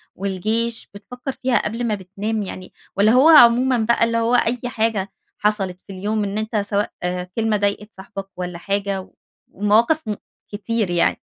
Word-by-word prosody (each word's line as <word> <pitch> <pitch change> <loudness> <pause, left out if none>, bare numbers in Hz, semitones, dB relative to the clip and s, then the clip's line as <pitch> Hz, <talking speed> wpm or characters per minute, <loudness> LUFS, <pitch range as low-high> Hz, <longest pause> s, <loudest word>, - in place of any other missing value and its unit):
والجيش 215 +5 -2
بتفكر 250 +6 -7
فيها 255 -3 0
قبل 230 +3 -3
ما 210 - +1
بتنام 205 +3 -4
يعني 185 -1 -8 0.2
والّا 205 +2 +4
هو 265 +6 +6
عمومًا 250 -3 +7
بقى 230 +1 +2
اللي 230 0 +1
هو 230 +2 +2
أي 240 0 +2
حاجة 220 -4 -1 0.3
حصلت 195 -4 -1
في 195 - -8
اليوم 210 +3 -1
إن 200 +1 -3
أنت 220 +1 -3
سواء 205 0 -1 0.4
كلمة 220 -2 +1
ضايقت 205 +1 -2
صاحبك 195 0 -8
والّا 180 -1 -4
حاجة 200 +1 -2
و - - -17 0.4
ومواقف 225 +8 +2
م 210 - -1 0.4
كتير 215 -1 -2
يعني؟ 175 -1 +1
210 Hz, 165 wpm, -21 LUFS, 200-230 Hz, 0.4 s, عمومًا